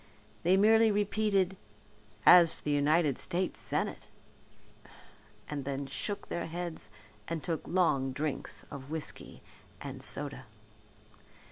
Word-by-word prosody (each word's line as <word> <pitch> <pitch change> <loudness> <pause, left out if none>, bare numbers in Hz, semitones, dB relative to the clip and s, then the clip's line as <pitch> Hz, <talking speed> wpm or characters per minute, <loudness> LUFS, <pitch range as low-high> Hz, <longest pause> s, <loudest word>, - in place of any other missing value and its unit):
They 185 +3 +4
merely 220 +2 +5
repeated 205 -2 +1 0.7
"as 175 -2 +8
for - - -17
the 150 - -1
United 145 0 +2
States 180 +1 -1
Senate - - -3 0.7
" 105 0 -23
and 145 -2 -4
then 140 +1 -3
shook 200 +9 -4
their 170 - -3
heads 170 -8 -5 0.4
and 165 -2 -3
took 165 -4 -3
long 150 -7 +2
drinks 140 +1 -3
of 140 -1 -8
whiskey 160 -1 -4 0.4
and 135 -2 -7
soda. 140 -1 -3
160 Hz, 120 wpm, -31 LUFS, 140-180 Hz, 0.7 s, as